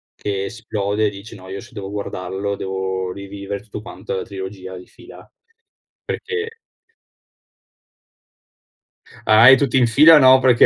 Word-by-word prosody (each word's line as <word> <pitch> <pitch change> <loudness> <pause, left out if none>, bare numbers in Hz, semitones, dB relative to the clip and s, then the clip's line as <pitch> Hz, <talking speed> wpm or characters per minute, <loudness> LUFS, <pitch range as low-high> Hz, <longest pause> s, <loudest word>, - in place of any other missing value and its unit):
che 100 -1 -3
esplode 105 -1 -2
e - - 0
dice: 100 +3 -11
“No, 95 -1 -13
io 95 +1 -6
se 120 - -15
devo 100 -2 -7
guardarlo 100 0 -4
devo 95 -1 -3
rivivere 100 0 -7
tutto 105 -1 -8
quanto, - - -8
la 95 - -3
trilogia 95 -2 -8
di 90 - -12
fila”, 405 - -16 0.8
perché 455 0 -5 2.7
Ah, 110 +4 +7
eh, 135 - +9
tutti 135 -1 +1
in 125 - +4
fila 155 +7 +7
no, 130 -1 +7
perché 125 -2 +5
100 Hz, 140 wpm, -20 LUFS, 95-120 Hz, 2.7 s, eh